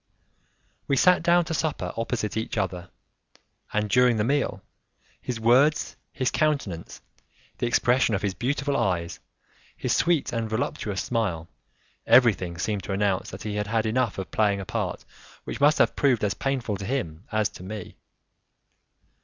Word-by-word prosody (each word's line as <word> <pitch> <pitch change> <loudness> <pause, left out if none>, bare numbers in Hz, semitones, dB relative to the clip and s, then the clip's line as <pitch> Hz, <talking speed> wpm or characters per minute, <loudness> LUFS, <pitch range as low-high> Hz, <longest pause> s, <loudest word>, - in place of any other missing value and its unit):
We 140 - +2
sat 180 +3 +5
down 175 +1 +4
to 165 - -3
supper 150 - -2
opposite 115 -2 -2
each 110 +1 -3
other, 90 -3 -2 0.8
and 105 0 0
during 125 +1 +4
the 105 - +1
meal, 125 -6 0 0.6
his 120 -2 -4
words, 130 +7 +3 0.2
his 130 - -1
countenance, 140 - -1 0.6
the 120 - 0
expression 120 -1 +2
of 100 - -3
his 100 -2 0
beautiful 140 +5 -1
eyes, 85 -7 -1 0.6
his - - 0
sweet 170 -6 +1
and 115 -1 -2
voluptuous 105 -3 -2
smile, 100 -9 -2 0.6
everything 100 -8 +4
seemed 100 +3 -2
to 100 - -3
announce 100 -1 0
that 95 - -8
he 105 -1 -3
had 105 0 -2
had 110 +1 0
enough 115 0 0
of 95 - -5
playing 105 -2 +2
a 95 - -5
part - - -3 0.4
which - - -6
must 150 +2 +5
have - - +3
proved 130 -7 +2
as 100 -1 +1
painful 125 -7 -2
to 100 - -6
him 95 - -3
as 110 -1 +2
to - - -13
me. 105 +1 -7
110 Hz, 160 wpm, -25 LUFS, 100-130 Hz, 0.8 s, sat